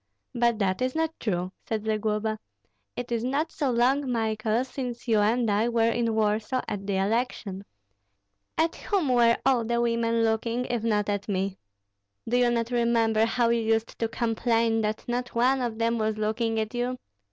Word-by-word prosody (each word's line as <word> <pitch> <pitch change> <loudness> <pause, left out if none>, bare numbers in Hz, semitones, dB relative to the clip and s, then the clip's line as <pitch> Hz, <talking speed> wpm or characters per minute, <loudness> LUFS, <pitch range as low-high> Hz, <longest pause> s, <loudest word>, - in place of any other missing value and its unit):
"But 235 -2 +2
that 190 -1 0
is 255 +2 0
not 320 0 0
true," 180 -4 -2 0.2
said 220 -1 -2
Zagloba. 215 0 -1 0.6
"It 245 0 -5
is 230 -1 0
not 285 +6 -1
so 285 -3 -1
long, 255 +3 +2
Michael, 220 0 0
since 250 -2 -6
you 220 -2 +3
and 225 +3 +2
I 215 +4 +2
were 230 -1 +2
in 230 -1 0
Warsaw 220 +4 0
at 200 -1 -4
the 195 -1 0
election. 200 -1 -1 0.9
At 325 +1 +1
whom 380 -9 0
were 235 -2 +4
all 260 -3 +3
the 235 +1 0
women 230 -1 +1
looking 230 +2 0
if 240 -2 -2
not 210 -3 +1
at 205 0 -2
me? 195 0 -1 0.7
Do 235 - 0
you 245 -1 +4
not 235 0 -1
remember 230 -2 +2
how 235 +1 +1
you 235 0 +2
used 225 0 0
to 230 - +1
complain 225 0 +1
that 215 0 -2
not 245 0 -3
one 255 +3 +3
of 235 -3 -2
them 230 0 +1
was 215 0 0
looking 220 +1 0
at 220 +1 -3
you? 245 +1 -2
230 Hz, 180 wpm, -27 LUFS, 220-245 Hz, 0.9 s, were